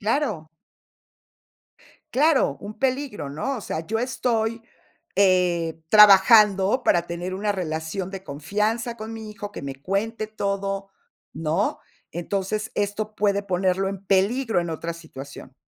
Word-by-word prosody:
Claro. 210 - -1 1.7
Claro, 275 - +3
un 205 +1 -8
peligro, 260 - -1
¿no? 240 - -3
O - - -7
sea, 160 -4 -4
yo 225 +1 -1
estoy, 230 -2 -1 0.5
eh, 180 -4 +2
trabajando 210 +2 +7
para 175 -6 +2
tener 175 +2 -4
una 205 +2 0
relación 175 +1 -3
de 190 -1 -8
confianza 210 - -2
con 220 +1 -7
mi 220 -1 -7
hijo, 210 -1 -8
que - - -7
me 135 -1 -5
cuente 205 - -2
todo, 200 -2 -3 0.4
¿no? 165 +6 -1 0.3
Entonces, 200 +5 -3
esto 210 +1 -2
puede 200 -1 +1
ponerlo 190 0 +1
en 195 0 -6
peligro 205 +4 +2
en 170 - -4
otra 165 +1 -4
situación. 140 -5 -11
200 Hz, 130 wpm, -24 LUFS, 175-220 Hz, 1.7 s, trabajando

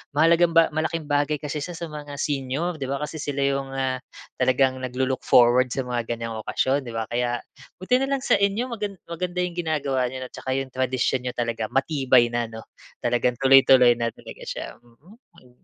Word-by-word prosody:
Mahalagang 165 +2 +4
ba 165 -1 +5
malaking 160 +1 -2
bagay 145 +1 +2
kasi 150 0 -4
siya 175 +4 -6
sa 170 0 -5
mga 145 -1 -7
senior 145 +4 -2
'di 135 - -3
ba, 140 - -1
kasi 150 +1 -5
sila 145 -1 -3
yung, 135 -1 -1
ah, 130 -1 -1 0.4
talagang 130 0 +2
naglo-look 130 +1 -2
forward 125 +1 +5
sa 135 - -2
mga 120 -2 -3
ganyang 115 -1 -5
okasyon 135 +5 0
'di 115 - -6
ba? 115 - -1
Kaya 120 0 0 0.4
buti 250 +7 +2
na 270 - 0
lang 270 -1 -1
sa - - +4
inyo 205 +5 0
magan 210 -3 -4
maganda 180 +1 -3
yung 175 -1 -4
ginagawa 140 -6 0
n'yo 130 +1 -6
'no, 125 - -9
'tsaka 130 - -8
yung 135 - -7
tradisyon 130 0 0
niyo 125 - -2
talaga 115 -2 -2
matibay 130 -4 +3
na 120 0 -1
ano 110 0 -9 0.4
talagang 120 0 +1
tuloy-tuloy 130 -2 +6
na 115 -1 0
talaga - - -12
siya, - - -6
mm. 130 - -22
135 Hz, 190 wpm, -24 LUFS, 125-160 Hz, 0.4 s, tuloy-tuloy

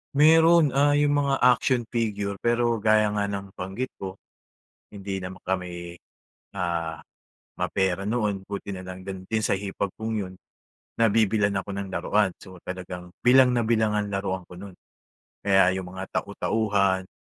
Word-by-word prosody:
Meron. 160 0 +6
Ah, 145 +1 +3
'yung 145 0 +3
mga 140 -1 +1
action 125 0 +4
figure, 105 -4 -2
pero 120 -1 +1
gaya 110 0 +3
nga 105 -1 0
ng 100 -1 -5
nabanggit 95 +8 -5
ko, 95 -1 -6 0.7
hindi 95 -1 -5
naman 90 +1 -8
kami, 90 -2 -4 0.6
ah, 85 -3 -2 0.6
mapera 95 0 0
noon. 105 -4 -1
Buti 100 0 -6
na 95 0 -8
lang 95 0 -8
din 95 -1 -7 0.2
sa 100 - +1
hipag 100 0 -3
kung 110 0 -3
'yun, 95 -3 -4 0.7
nabibilhan 105 -2 +3
ako 100 - -8
ng 100 -1 -4
laruan. 100 +1 +1
So 95 -1 -12
talagang 90 -1 -7
bilang 125 +1 +6
na 120 - +2
bilang 110 -2 +2
ang 105 0 -1
laruan 95 -1 -2
ko, 90 - -12
no'n. 100 -2 -10 0.7
Kaya 95 -2 +5
'yung 95 -1 -4
mga 95 +1 -6
tau-tauhan, 100 -4 0
100 Hz, 150 wpm, -25 LUFS, 95-115 Hz, 0.7 s, Meron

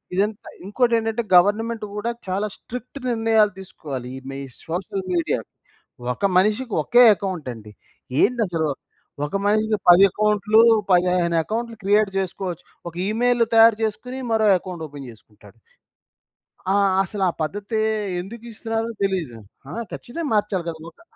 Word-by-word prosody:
ఇదంతా 205 +2 -1 0.2
ఇంకోటేంటంటే 230 +1 +1
గవర్నమెంట్ 215 +4 +3
కూడా 225 +3 -2 0.2
చాలా 195 +3 -1
స్ట్రిక్ట్ 250 +3 -8
నిర్ణయాలు 225 -2 +3
తీసుకోవాలి 140 -9 -7
ఈ - - -7
మీ 135 - -6 0.3
సోషల్ 185 +3 -4
మీడియా. 170 -1 0 0.7
ఒక 200 - -2
మనిషికి 215 +4 0
ఒకే 245 +9 +6
అకౌంటండి. 130 - -6 0.5
ఏందసలు? 180 -11 0 0.6
ఒక 150 - -5
మనిషికి 215 0 +2
10 175 +2 +8
అకౌంట్‌లు, 210 +1 +3 0.3
15 180 -1 +3
అకౌంట్‌లు 230 +4 -4
క్రియేట్ 205 0 +3
జేసుకోవచ్చు. 180 -2 -3 0.3
ఒక 165 - -18
ఇమెయిల్ 240 +2 +2
తయారు 225 -1 +7
జేసుకొని 250 +4 -3
మరో 220 -1 +3
అకౌంట్ 175 -3 -7
ఓపెన్ 140 -2 -10
జేసుకుంటాడు. 105 -1 -19 1.2
ఆ! - - +2 0.3
అసలా 195 +1 -2 0.2
పద్ధతే 205 +6 -3 0.4
ఎందుకిస్తున్నారో 225 +2 -5
తెలీదు. 180 -12 -2 0.3
ఆ! - - -7 0.2
ఖచ్చితంగా 295 +5 -5
మార్చాలి 205 -4 0
గదా! 160 - -7
ఒకక - - -25
205 Hz, 120 wpm, -22 LUFS, 175-225 Hz, 1.2 s, 10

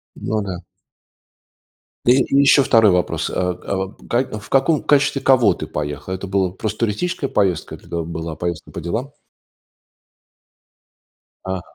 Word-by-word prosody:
Ну 110 0 -2
да. 90 -3 -5 1.5
И - - +8 0.2
и 140 - +4
ещё 140 0 +6
2 110 -5 +5
вопрос. 90 -3 0
А 90 0 0 0.2
а 95 0 -2
как 120 -3 -1
в - - -13
каком 140 +3 +2
качестве 145 -1 +2
кого 125 -6 +5
ты - - -6
поехал? 75 +4 -4
Это 95 +1 -5
была 95 -1 +1
просто 105 +3 -4
туристическая 140 - -1
поездка? 95 -6 0
Или - - -13
это 85 -1 -3
была 80 -1 -5
поездка 85 0 -4
по - - -6
делам? 115 - -3 2.3
А. 95 -1 -3
100 Hz, 145 wpm, -20 LUFS, 90-130 Hz, 2.3 s, И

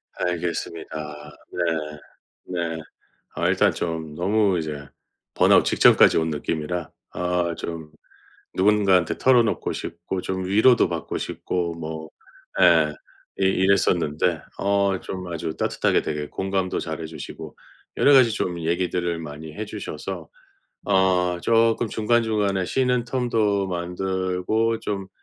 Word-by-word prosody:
알겠습니다. 80 -3 -4 0.2
네. 90 - -1 0.8
네. 85 -2 -3 0.6
어 - - 0
일단 - - +3
좀 80 -2 -4
너무 100 +1 +2
이제 75 -3 -5 0.5
번아웃 - - +5
직전까지 - - +5
온 80 0 0
느낌이라 80 +3 -3 0.2
어 90 -1 0
좀 80 -2 -6 0.6
누군가한테 95 -3 +3
털어놓고 120 -4 +2
싶고 85 +3 -5
좀 95 0 -3
위로도 110 +6 +4
받고 - - -4
싶고 85 -2 -3
뭐 80 -1 -6 0.5
예 80 -3 +5 0.5
이 95 - +2
이랬었는데 90 -4 +2 0.2
어 100 -1 +1
좀 95 -1 -6
아주 80 -1 -4
따뜻하게 - - +1
되게 75 -1 -3
공감도 95 -1 -2
잘 80 -2 -5
해 80 - -4
주시고 80 -2 -9 0.4
여러 145 - +5
가지 130 -3 +7
좀 90 -4 -2
얘기들을 85 0 -1
많이 75 0 -8
해 110 - -4
주셔서 - - -6 0.6
어 90 -2 +2
조끔 115 0 +3
중간중간에 110 -4 +1
쉬는 125 +2 +1
텀도 110 -6 0
만들고 95 +5 -1
좀 100 -3 -3
90 Hz, 250 characters per minute, -23 LUFS, 80-100 Hz, 0.8 s, 가지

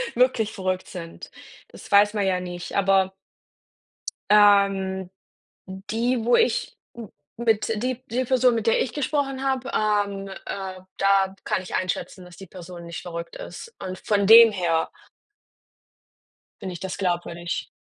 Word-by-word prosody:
wirklich 240 -3 +2
verrückt 185 -1 -3
sind 170 -2 -9 0.4
Das - - -14
weiß 205 +1 +5
man 205 -2 0
ja 185 -1 +1
nicht. 175 -1 -7
Aber 195 -1 +2 1.2
ähm, 195 -3 +4 0.6
d 190 0 -8
die, 235 +1 0
wo 240 - +4
ich 465 - 0 0.2
m 230 -4 -9 0.3
mit 225 -3 +1
die 255 0 -2
die 255 +2 -1
Person, 255 -1 +3
mit 225 -1 -2
der 225 - +3
ich 240 - -4
gesprochen 275 -1 -2
habe, 265 -1 -1
ähm, 205 -2 0 0.2
äh, 190 -1 -6 0.2
da 195 -1 +3
kann 185 - -1
ich 185 - -9
einschätzen, 185 0 -3
dass 175 -1 -14
die 195 - -11
Person 175 -1 -10
nicht 170 0 -7
verrückt 170 -1 -7
ist. 465 - -9
Und 185 -1 -5
von 200 -2 0
dem 225 +1 +9
her 170 -4 0 1.7
finde 190 -2 -5
ich 175 - -8
das 190 -1 -5
glaubwürdig. 175 -2 -3
195 Hz, 150 wpm, -24 LUFS, 185-230 Hz, 1.7 s, dem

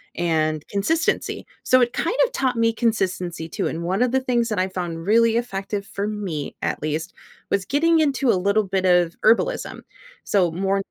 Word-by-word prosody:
and 155 -3 0
consistency, 315 +12 -1 0.2
so 255 0 +4
it 240 - +2
kind 480 - -1
of - - -6
taught 260 - 0
me 230 0 +3
consistency 185 -8 -1
too, - - -2
and 170 +1 -4
one 190 +5 -1
of 250 -1 +2
the 265 0 +2
things 240 -2 0
that 210 -3 -1
I 185 - 0
found 175 -3 -5
really 230 +2 +4
effective, 200 -4 -3
for 200 +1 -4
me, 195 -9 -4
at - - -2
least, 155 +3 -3 0.4
was 200 -1 0
getting 325 +4 +3
into 275 -5 +2
a - - +2
little 200 +3 +2
bit 190 -1 -1
of 175 -2 +3
herbalism. 480 - +2 0.4
So, 185 -4 +2
more 195 +3 0
200 Hz, 185 wpm, -22 LUFS, 180-240 Hz, 0.4 s, so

